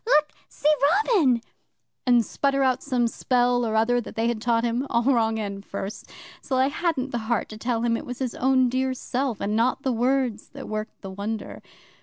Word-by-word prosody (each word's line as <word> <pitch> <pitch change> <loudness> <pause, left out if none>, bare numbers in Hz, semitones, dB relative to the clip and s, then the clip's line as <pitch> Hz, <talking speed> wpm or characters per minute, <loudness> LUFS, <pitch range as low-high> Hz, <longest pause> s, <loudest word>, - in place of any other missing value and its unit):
Look, 305 -11 +3 0.2
see, 300 - +1 0.3
Robin!" 270 - +3 0.6
and 240 -2 +5
sputter 275 -1 0
out 260 -1 +2
some 250 -4 0
spell 245 +1 +1
or 220 -1 -1
other 240 +2 +3
that - - -10
they 225 +1 +1
had 235 -2 -1
taught 230 0 +1
him, 240 +3 -1
all 235 0 +2
wrong 230 -4 +2
end 200 -2 -4
first, 200 +1 -6 0.3
till 265 - -2
I 260 +1 +3
hadn't 290 -4 -1
the 240 - -1
heart 235 - 0
to 215 - -8
tell 235 0 -1
him 235 -1 +2
it - - -6
was 250 0 -5
his 255 -3 -3
own 260 0 +3
dear 260 +1 0
self 255 -2 -2
and 210 +1 -1
not 250 +4 +1
the 265 - +1
words 245 -2 0
that - - -8
worked 215 0 -5
the 195 - -6
wonder. 205 +3 -5
245 Hz, 205 wpm, -25 LUFS, 225-265 Hz, 0.6 s, and